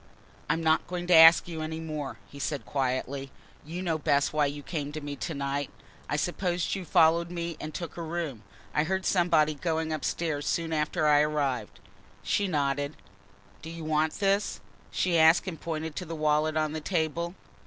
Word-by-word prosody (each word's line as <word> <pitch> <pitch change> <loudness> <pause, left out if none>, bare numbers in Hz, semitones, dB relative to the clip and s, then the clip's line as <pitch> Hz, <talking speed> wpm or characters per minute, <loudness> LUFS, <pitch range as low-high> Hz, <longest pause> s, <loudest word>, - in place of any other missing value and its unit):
"I'm 165 - +1
not 160 0 +2
going 175 -1 -4
to 180 - +3
ask 165 +2 +8
you 165 -2 -5
any 160 +1 -4
more," 150 -6 -5
he 140 - -12
said 145 0 -3
quietly. 135 0 -2 0.3
"You 170 +5 -6
know 165 -3 0
best 140 0 +2
why 150 -1 +3
you 145 +1 -6
came 145 -3 -4
to 155 - -4
me 145 -1 -5
to 160 +5 -4
night 140 0 -2 0.4
I - - 0
suppose 175 +2 -1
you 190 -2 -4
followed 170 0 +4
me 170 -1 -4
and 155 - -5
took 170 +2 -6
a - - -4
room. 160 -8 -4 0.3
I 150 - +2
heard 190 +2 -1
somebody 165 -4 +3
going 160 +1 -2
upstairs 155 -1 -2
soon 165 -1 -1
after 155 0 0
I 150 -1 +6
arrived." 140 - -1 0.4
She 205 - +1
nodded. 145 -2 -1 0.7
"Do 160 - -8
you 165 0 -7
want 155 0 +1
this?" 200 0 0 0.3
she 175 -3 +1
asked 160 +3 +6
and 165 -4 -5
pointed 160 -1 -4
to 180 - -3
the 165 0 -5
wallet 155 0 +1
on 155 -1 +1
the 155 0 -4
table. 170 +1 -1
155 Hz, 185 wpm, -28 LUFS, 145-170 Hz, 0.7 s, ask